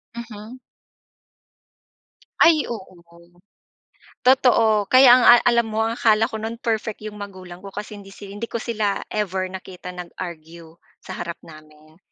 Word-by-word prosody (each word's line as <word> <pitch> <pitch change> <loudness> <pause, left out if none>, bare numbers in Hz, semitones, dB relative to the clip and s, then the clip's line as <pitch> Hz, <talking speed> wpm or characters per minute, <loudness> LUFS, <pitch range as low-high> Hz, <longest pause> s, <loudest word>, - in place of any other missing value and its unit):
Mhm. 235 +1 -10 1.8
Ay, 320 -2 +5
oo, 195 -5 -8 1.3
totoo. 230 -5 +4
Kaya, 255 0 +7
ang 250 - +3
a - - +10
alam 235 -1 +2
mo, 220 0 -1
ang 230 +1 -2
akala 220 +1 +3
ko 220 - -6
no'n, 225 +2 -5
perfect 220 -2 -3
'yong 215 -1 -8
magulang 185 -3 -10
ko, 195 0 -11
kasi 210 0 -7
hindi 195 0 -14
si 200 -1 -11
hindi 205 +3 -6
ko 235 - -4
sila 215 -4 -2
ever 190 -3 -2
nakita 185 -1 -9
nag-argue 170 -2 -10 0.3
sa - - -8
harap 170 -1 -5
namin. 155 0 -17
210 Hz, 145 wpm, -22 LUFS, 185-230 Hz, 1.8 s, a